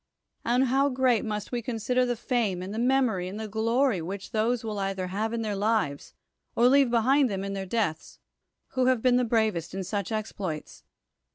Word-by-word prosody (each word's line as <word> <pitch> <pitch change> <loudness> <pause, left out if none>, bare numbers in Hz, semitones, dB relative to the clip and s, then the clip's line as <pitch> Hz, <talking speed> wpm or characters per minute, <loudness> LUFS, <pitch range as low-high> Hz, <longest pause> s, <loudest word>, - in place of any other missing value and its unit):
And 245 +3 +2
how 270 +3 +2
great 255 -3 +2
must 210 -2 -4
we 245 -1 -2
consider 250 +2 0
the 245 - 0
fame, 220 -6 -1
and 190 +2 -6
the 220 - -3
memory, 240 -7 +2
and 200 +3 -6
the 220 - -4
glory 225 0 +1
which 190 +4 -6
those 230 +1 0
will 215 -2 -4
either 195 -1 -2
have 205 +5 -2
in 230 -1 -2
their 210 -2 -2
lives, 200 -9 -1 0.4
or 240 - +5
leave 275 0 +5
be 235 - +2
hind 270 +2 +3
them 195 -2 -3
in 195 0 -4
their 195 -1 -4
deaths, 180 -7 -2 0.5
who 255 -1 +1
have 255 -3 +2
been 250 -1 +4
the 250 - +2
bravest 220 -8 0
in 195 - -3
such 200 +2 -3
exploits? 200 -7 -5
220 Hz, 200 wpm, -27 LUFS, 195-245 Hz, 0.5 s, or